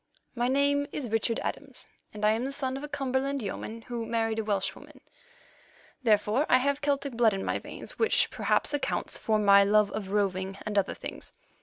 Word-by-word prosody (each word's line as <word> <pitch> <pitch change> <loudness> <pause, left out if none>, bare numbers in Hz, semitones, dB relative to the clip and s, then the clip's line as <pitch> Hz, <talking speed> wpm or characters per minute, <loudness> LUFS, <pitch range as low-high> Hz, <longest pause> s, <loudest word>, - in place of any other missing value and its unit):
My 240 0 0
name 285 +2 +2
is 265 -6 -4
Richard 225 +1 +1
Adams, - - -5 0.3
and 210 0 -3
I 210 - +5
am 225 +2 0
the 270 - -2
son 265 -2 -2
of 275 - -6
a - - -4
Cumberland 275 -2 -1
yeoman 225 +3 -5
who 240 -1 -4
married 225 -1 0
a - - -1
Welshwoman. 200 -2 -3 1.0
Therefore 220 +4 +2
I 255 - +7
have 280 +2 0
Celtic 280 -2 0
blood 230 -3 +3
in 195 - -4
my - - -1
veins, - - -8
which 450 0 +3
perhaps - - +1
accounts 290 - -1
for 220 -1 +1
my 200 -1 +6
love 210 0 +3
of 200 -2 -5
roving 195 -1 -1
and 215 -1 -3
other 200 -1 +1
things. - - -7
230 Hz, 190 wpm, -28 LUFS, 210-275 Hz, 1.0 s, I